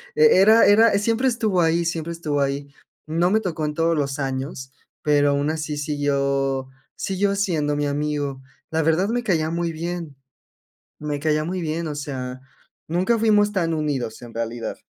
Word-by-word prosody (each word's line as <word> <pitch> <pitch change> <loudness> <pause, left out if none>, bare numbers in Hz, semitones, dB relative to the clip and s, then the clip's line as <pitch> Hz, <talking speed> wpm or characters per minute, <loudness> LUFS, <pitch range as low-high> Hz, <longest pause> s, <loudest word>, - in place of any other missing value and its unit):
e 155 - +5 0.2
era 220 +3 +7
era, 210 0 +5
siempre 230 +5 +1
estuvo 220 -7 +1
ahí, 165 +1 +2
siempre 165 0 -2
estuvo 150 -4 -2
ahí. 140 +1 -2 0.3
No 165 +3 +1
me 215 +2 +3
tocó 170 -6 -3
en 150 0 -2
todos 165 +1 +2
los 140 -2 -1
años, 135 0 -4 0.3
pero 145 -1 +3
aun 140 +2 +1
así 155 -1 -3
siguió, 140 -2 0 0.3
siguió 200 +1 -1
siendo 160 -7 0
mi 145 0 0
amigo. 145 -2 -2 0.3
La 160 0 +1
verdad, 165 +6 +2
me 245 +1 0
caía 160 -7 0
muy 170 0 -1
bien, 165 -2 -5 0.8
me 150 -1 -3
caía 155 0 +1
muy 185 +1 -3
bien. 165 0 -2
O 150 - -4
sea, 130 -3 -5 0.5
nunca 185 +8 +1
fuimos 210 -2 +3
tan 170 -4 0
unidos, 140 -8 -2
en 120 -1 -11
realidad. 115 0 -4
155 Hz, 170 wpm, -23 LUFS, 145-175 Hz, 0.8 s, era